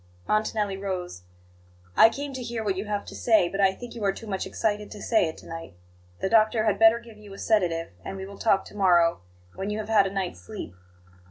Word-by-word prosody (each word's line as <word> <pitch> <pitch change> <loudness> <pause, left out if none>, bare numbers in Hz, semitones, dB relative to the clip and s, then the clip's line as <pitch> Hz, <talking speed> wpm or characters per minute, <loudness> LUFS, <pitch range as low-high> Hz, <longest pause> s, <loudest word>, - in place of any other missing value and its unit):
Montanelli 215 -2 0
rose. 185 - -4 0.7
"I 225 - +8
came 280 +3 -5
to 260 - -5
hear 235 -2 -4
what 200 -3 0
you 195 +3 -4
have 205 -1 -3
to - - -9
say; 220 -7 +3
but 195 +3 -2
I 195 -1 +5
think 240 +5 -9
you 230 - -6
are 195 - +3
too 225 - -9
much 195 -3 -3
excited 210 -1 -1
to 210 - -9
say 220 -4 +2
it 160 - -6
to - - -13
night. 165 - -8 0.5
The - - +1
doctor 220 0 +4
had 215 - +1
better 225 +1 +7
give 230 -2 -13
you 210 -1 -13
a - - -10
sedative, 175 -8 +1
and 195 - -6
we 190 - -6
will 200 0 -11
talk 195 -4 +2
to - - -13
morrow, 175 -4 +4 0.3
when 195 +1 -4
you 210 - -2
have 215 0 -5
had 205 -3 +5
a - - -5
night's 190 - -3
sleep." 90 -1 -8
205 Hz, 240 wpm, -26 LUFS, 190-220 Hz, 0.7 s, I